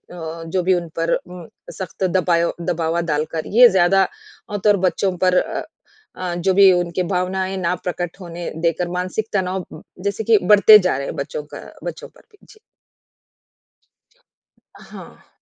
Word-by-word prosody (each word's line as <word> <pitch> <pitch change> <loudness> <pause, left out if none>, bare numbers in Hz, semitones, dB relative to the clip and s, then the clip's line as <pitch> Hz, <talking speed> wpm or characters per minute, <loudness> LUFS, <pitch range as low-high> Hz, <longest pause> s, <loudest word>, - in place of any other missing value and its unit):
अ, 165 -1 -7
जो 180 +2 -1
भी 185 +2 +3
उन 175 -2 -2
पर 165 +1 +1
उह, 180 -2 -6 0.2
सख़्त 190 0 -7
दबायो 175 -2 +1
दबावा 170 -1 -1
डालकर 155 +2 -2
ये 250 0 +10
ज़्यादा 190 0 +3 0.4
अ, 205 - -3
तर 205 -1 +4
बच्चों 185 +1 -1
पर 185 0 +2
अ - - -1 0.5
अ, 180 -1 -4
जो 175 +2 0
भी 195 0 +7
उनकी 175 0 0
भावनाएँ 185 +1 -2
ना 180 -1 0
प्रकट 175 0 -4
होने 170 -1 -6 0.2
देकर 170 +1 0
मानसिक 185 +4 -3
तनाव 185 -2 -1
उ, 155 - -11 0.2
जैसे 200 +2 -2
कि 220 0 +4
बढ़ते 210 +3 +8
जा 180 -8 0
रहे 140 - -4
हैं - - -5
बच्चों 140 +2 -5
का - - -7 0.2
बच्चों - - -6
पर - - -22
भी। 415 - -23
जी। 435 - -18 2.2
हाँ। - - -13
180 Hz, 165 wpm, -20 LUFS, 170-190 Hz, 2.2 s, ये